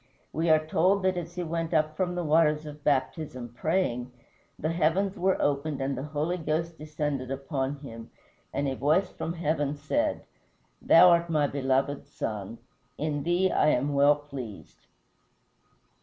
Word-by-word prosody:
We 160 Hz, +3 st, 0 dB
are 155 Hz, 0 st, +4 dB
told 185 Hz, +5 st, +2 dB
that 185 Hz, 0 st, +2 dB
as 175 Hz, -1 st, -5 dB
he 180 Hz, -, -2 dB
went 165 Hz, 0 st, -2 dB
up 155 Hz, 0 st, +1 dB
from 180 Hz, +1 st, -1 dB
the 175 Hz, -, -2 dB
waters 155 Hz, -1 st, +3 dB
of 150 Hz, -1 st, -10 dB
baptism, 130 Hz, -2 st, -1 dB
praying, 130 Hz, -7 st, -1 dB, 0.5 s
the 155 Hz, -, -1 dB
heavens 175 Hz, +4 st, +1 dB
were 190 Hz, 0 st, +1 dB
opened 145 Hz, 0 st, 0 dB
and 135 Hz, 0 st, -1 dB
the 130 Hz, -, -4 dB
Holy 155 Hz, +4 st, -1 dB
Ghost 165 Hz, 0 st, -2 dB
descended 150 Hz, -4 st, -3 dB
upon 135 Hz, 0 st, -2 dB
him, 115 Hz, -5 st, -9 dB, 0.4 s
and 140 Hz, 0 st, -1 dB
a 135 Hz, -, -1 dB
voice 155 Hz, +8 st, +2 dB
from 165 Hz, -, -4 dB
heaven 150 Hz, -3 st, -1 dB
said, 145 Hz, -, -1 dB, 0.6 s
"Thou 180 Hz, +2 st, +7 dB
art 170 Hz, 0 st, +3 dB
my 155 Hz, -3 st, +2 dB
beloved 135 Hz, 0 st, 0 dB
Son, 105 Hz, +1 st, -5 dB, 0.4 s
in 150 Hz, -1 st, -2 dB
thee 175 Hz, +4 st, +2 dB
I -, -, +3 dB
am 145 Hz, 0 st, +2 dB
well 140 Hz, +1 st, +5 dB
pleased." 140 Hz, -8 st, -10 dB
150 Hz, 155 wpm, -28 LUFS, 140-170 Hz, 0.6 s, Thou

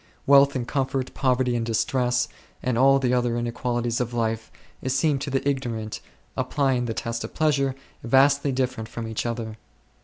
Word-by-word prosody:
Wealth 140 Hz, 0 st, +6 dB
and 120 Hz, -2 st, -2 dB
comfort, 135 Hz, -1 st, -1 dB
poverty 130 Hz, -2 st, +1 dB
and 115 Hz, -, 0 dB
distress, 125 Hz, +2 st, +1 dB, 0.4 s
and 125 Hz, -2 st, 0 dB
all 135 Hz, +3 st, +5 dB
the 125 Hz, -2 st, +1 dB
other 120 Hz, -1 st, +1 dB
inequalities 120 Hz, 0 st, -1 dB
of 120 Hz, 0 st, -3 dB
life, 115 Hz, -1 st, -1 dB, 0.4 s
seem 135 Hz, +2 st, +2 dB
to 145 Hz, -, -4 dB
the 135 Hz, +1 st, -1 dB
ignorant, 115 Hz, -6 st, -2 dB, 0.3 s
applying 135 Hz, -4 st, 0 dB
the 115 Hz, -2 st, -3 dB
test 115 Hz, 0 st, -3 dB
of -, -, -8 dB
pleasure, 140 Hz, -4 st, +2 dB, 0.3 s
vastly 140 Hz, +3 st, +4 dB
different 125 Hz, -4 st, -2 dB
from 115 Hz, -1 st, -5 dB
each 110 Hz, +1 st, -3 dB
other. 115 Hz, -2 st, -4 dB
125 Hz, 160 wpm, -25 LUFS, 115-135 Hz, 0.4 s, Wealth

